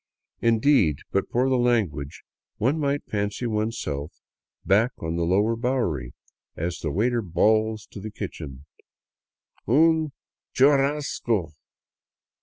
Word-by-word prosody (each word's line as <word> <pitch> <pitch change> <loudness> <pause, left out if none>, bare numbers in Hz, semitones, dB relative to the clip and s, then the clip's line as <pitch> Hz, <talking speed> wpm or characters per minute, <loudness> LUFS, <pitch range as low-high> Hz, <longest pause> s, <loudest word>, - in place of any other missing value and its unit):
Indeed, 115 - +3
but 100 - 0
for 125 +2 +1
the 130 -1 +2
language, 100 - 0 0.3
one 135 +8 +1
might 145 -1 0
fancy 105 +3 -2
oneself 105 -10 -2 0.5
back 110 +6 +3
on 80 0 -4
the 85 - -1
lower 100 +6 +2
Bowery 115 - -1 0.4
as 85 +2 -3
the 80 - -3
waiter 115 - +1
bawls 110 +4 +1
to - - -8
the 110 +2 -6
kitchen: 70 -8 -7 0.5
" - - -41
Un 160 +4 +4 0.4
churrasco 135 - +2
110 Hz, 115 wpm, -25 LUFS, 90-125 Hz, 0.5 s, Un